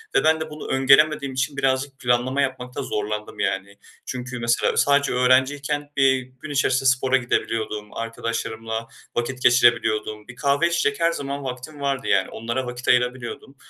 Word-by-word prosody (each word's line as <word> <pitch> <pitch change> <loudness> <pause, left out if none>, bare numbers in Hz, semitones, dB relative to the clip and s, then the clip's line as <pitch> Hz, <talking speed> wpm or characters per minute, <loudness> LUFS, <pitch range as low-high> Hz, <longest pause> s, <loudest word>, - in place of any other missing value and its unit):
Ve - - +4
ben 160 0 +4
de 160 - -4
bunu 150 0 -8
öngöremediğim 135 +1 +4
için 130 +2 -2
birazcık 135 0 0
planlama 125 +3 +1
yapmakta 130 -2 -3
zorlandım, 105 0 -4
yani. 100 +1 -2 0.3
Çünkü 125 -1 -5
mesela 115 0 +1
sadece 140 0 +3
öğrenciyken, 140 +3 +2
eee, 135 -1 +4
gün 130 +4 -12
içerisinde 135 -1 +2
spora 130 +1 +2
gidebiliyordum, 110 -4 -2
arkadaşlarımla 115 0 -4 0.3
vakit 125 +2 -2
geçirebiliyordum. 110 -4 +3
Bir 120 - -11
kahve 140 +5 +2
içecek 170 -3 0
her 165 0 +3
zaman 140 -2 -4
vaktim 130 +3 -7
vardı 140 -1 -1
yani. - - +2
Onlara 120 +3 -3
vakit 125 +1 -7
ayırabiliyordum. 125 +2 0
130 Hz, 150 wpm, -23 LUFS, 120-140 Hz, 0.3 s, Ve